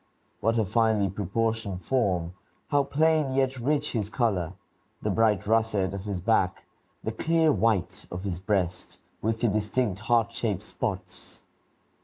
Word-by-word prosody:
What 115 Hz, +1 st, +1 dB
a 110 Hz, -, +2 dB
finely 110 Hz, -1 st, +2 dB
proportioned 100 Hz, -1 st, -2 dB
form! 95 Hz, -9 st, +1 dB, 0.4 s
How 145 Hz, -1 st, +4 dB
plain, 155 Hz, -1 st, +2 dB
yet 135 Hz, -1 st, +1 dB
rich, 145 Hz, +4 st, 0 dB
his 105 Hz, -4 st, -1 dB
color, 100 Hz, -8 st, 0 dB, 0.5 s
the -, -, +1 dB
bright 105 Hz, -3 st, +2 dB
russet 110 Hz, -3 st, +2 dB
of 100 Hz, 0 st, -5 dB
his 100 Hz, -3 st, -2 dB
back, 95 Hz, -1 st, +1 dB, 0.4 s
the -, -, -1 dB
clear 165 Hz, -1 st, +2 dB
white 100 Hz, -, 0 dB
of 90 Hz, +1 st, -6 dB
his 90 Hz, -4 st, -3 dB
breast, 95 Hz, -3 st, -1 dB, 0.2 s
with 110 Hz, +1 st, -1 dB
the 120 Hz, -, +3 dB
distinct 105 Hz, 0 st, 0 dB
heart 115 Hz, 0 st, +2 dB
shaped 110 Hz, -6 st, -2 dB
spots! -, -, -5 dB
110 Hz, 145 wpm, -27 LUFS, 95-120 Hz, 0.5 s, How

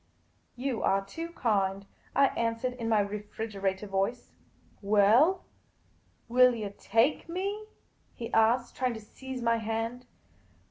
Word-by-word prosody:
" -, -, -41 dB
You 260 Hz, -5 st, -1 dB
are 195 Hz, 0 st, +1 dB
too 330 Hz, +11 st, -6 dB
kind," 200 Hz, -, 0 dB, 0.3 s
I 275 Hz, -1 st, +5 dB
answered, 230 Hz, +2 st, -1 dB
in 230 Hz, -2 st, -4 dB
my 215 Hz, -2 st, +4 dB
refrigerator 205 Hz, -1 st, -3 dB
voice. 195 Hz, +5 st, -2 dB, 0.3 s
" -, -, -33 dB
Well, 215 Hz, -, +4 dB, 0.8 s
will 250 Hz, +1 st, +5 dB
you 210 Hz, -3 st, -5 dB
take 230 Hz, +10 st, +1 dB
me? 400 Hz, +5 st, -3 dB, 0.2 s
" -, -, -39 dB
he 230 Hz, -, -7 dB
asked, 235 Hz, +2 st, +3 dB
trying 255 Hz, -2 st, -1 dB
to -, -, -6 dB
seize 255 Hz, +3 st, -8 dB
my 230 Hz, 0 st, +3 dB
hand. 225 Hz, +3 st, -3 dB
230 Hz, 140 wpm, -29 LUFS, 205-255 Hz, 0.8 s, I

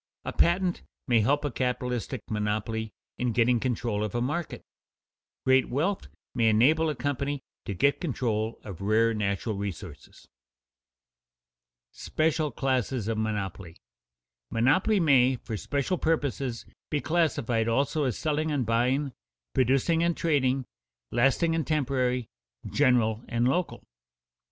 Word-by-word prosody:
A -, -, -3 dB
patent 175 Hz, +1 st, +2 dB, 0.3 s
may 120 Hz, -3 st, +4 dB
help 145 Hz, +7 st, +2 dB
a 145 Hz, -, -1 dB
capitalistic 125 Hz, -1 st, -2 dB
monopoly 110 Hz, +1 st, -2 dB, 0.3 s
in 125 Hz, -2 st, 0 dB
getting 120 Hz, +1 st, +3 dB
control 115 Hz, -4 st, -1 dB
of 105 Hz, +1 st, -4 dB
a -, -, +1 dB
market; 150 Hz, +7 st, -3 dB, 0.8 s
great 130 Hz, 0 st, +4 dB
wealth 170 Hz, +10 st, -1 dB, 0.3 s
may 115 Hz, -3 st, +3 dB
enable 150 Hz, +9 st, +4 dB
a 150 Hz, -, -2 dB
company 145 Hz, 0 st, -2 dB, 0.2 s
to 100 Hz, -, -4 dB
get 140 Hz, +9 st, +2 dB
control 115 Hz, -, -1 dB
of 100 Hz, -4 st, -8 dB
rare 110 Hz, +3 st, +3 dB
natural 105 Hz, +1 st, -1 dB
resources. 100 Hz, -4 st, -7 dB, 1.6 s
[Sidenote: -, -, -13 dB
Special 155 Hz, -1 st, +1 dB
classes 130 Hz, -4 st, -1 dB
of 115 Hz, -1 st, -1 dB
monopoly] 100 Hz, -5 st, -3 dB, 0.8 s
2. -, -, -6 dB
_Monopolies 170 Hz, -, +3 dB
may, 130 Hz, -4 st, +5 dB
for 115 Hz, -2 st, -6 dB
special 140 Hz, -, -1 dB
purposes, 140 Hz, -6 st, -1 dB, 0.2 s
be 150 Hz, -, 0 dB
classified 140 Hz, -9 st, +1 dB
also 140 Hz, +5 st, +1 dB
as 125 Hz, -5 st, -1 dB
selling 155 Hz, 0 st, -1 dB
and 140 Hz, -4 st, 0 dB
buying, 125 Hz, +5 st, +1 dB, 0.4 s
producing 135 Hz, +6 st, +2 dB
and 170 Hz, 0 st, +1 dB
trading, 135 Hz, -5 st, +1 dB, 0.5 s
lasting 135 Hz, +7 st, +2 dB
and 165 Hz, -2 st, -1 dB
temporary, 130 Hz, -5 st, 0 dB, 0.4 s
general 115 Hz, -3 st, +2 dB
and 120 Hz, +1 st, +1 dB
local. 175 Hz, +6 st, -1 dB
125 Hz, 130 wpm, -27 LUFS, 115-145 Hz, 1.6 s, may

